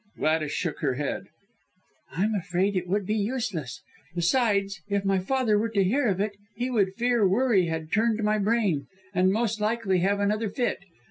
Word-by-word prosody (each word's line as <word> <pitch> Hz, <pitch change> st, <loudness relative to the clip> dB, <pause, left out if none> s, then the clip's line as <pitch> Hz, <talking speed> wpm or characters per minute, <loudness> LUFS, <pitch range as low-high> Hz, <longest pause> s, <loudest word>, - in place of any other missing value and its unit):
Gladys 155 Hz, -1 st, +1 dB
shook 165 Hz, -1 st, -2 dB
her 135 Hz, -4 st, 0 dB
head. 145 Hz, +1 st, -3 dB, 0.8 s
"I'm 205 Hz, +6 st, 0 dB
afraid 190 Hz, 0 st, 0 dB
it 180 Hz, -1 st, -1 dB
would 200 Hz, +2 st, 0 dB
be 210 Hz, -, -1 dB
useless. 210 Hz, -, -3 dB, 0.3 s
Besides, 200 Hz, +1 st, +1 dB
if 200 Hz, -1 st, 0 dB
my 195 Hz, -1 st, +2 dB
father 220 Hz, +1 st, +1 dB
were 225 Hz, +2 st, 0 dB
to 200 Hz, -3 st, +2 dB
hear 245 Hz, +8 st, +2 dB
of 195 Hz, -3 st, 0 dB
it, 210 Hz, +1 st, 0 dB, 0.2 s
he 245 Hz, +3 st, -2 dB
would 195 Hz, -5 st, +1 dB
fear 235 Hz, -3 st, +2 dB
worry 205 Hz, -3 st, +3 dB
had 160 Hz, -1 st, -4 dB
turned 220 Hz, +2 st, +1 dB
my 210 Hz, 0 st, +2 dB
brain, 205 Hz, -8 st, +1 dB, 0.3 s
and 185 Hz, 0 st, +3 dB
most 220 Hz, 0 st, 0 dB
likely 210 Hz, -4 st, +1 dB
have 200 Hz, +3 st, +1 dB
another 210 Hz, +2 st, 0 dB
fit. 245 Hz, +3 st, -1 dB
200 Hz, 180 wpm, -26 LUFS, 185-225 Hz, 0.8 s, worry